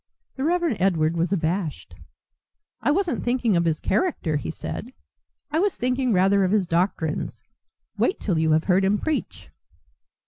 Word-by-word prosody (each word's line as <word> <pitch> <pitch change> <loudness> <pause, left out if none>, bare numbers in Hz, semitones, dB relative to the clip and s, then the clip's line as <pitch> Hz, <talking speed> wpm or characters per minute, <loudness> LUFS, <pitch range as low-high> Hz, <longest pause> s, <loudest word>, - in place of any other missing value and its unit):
The 265 - -4
Reverend 340 - +1
Edward 170 -4 +2
was 170 +2 0
abashed. 170 -2 -2 0.9
"I - - +1
wasn't 345 +2 0
thinking 240 -4 +1
of 170 0 +2
his 160 -2 +1
character," 195 - 0
he - - -5
said. 235 +8 -6 0.6
"I 310 - +1
was 400 +1 +1
thinking 250 +1 0
rather 195 +1 +4
of 185 - +2
his 205 -1 +2
doctrines. 170 -2 -1 0.6
Wait 380 - +1
till 180 -6 0
you 160 -1 +3
have 155 +1 +3
heard 190 0 +3
him 200 +2 +3
preach." 315 +7 -4
195 Hz, 160 wpm, -24 LUFS, 170-255 Hz, 0.9 s, rather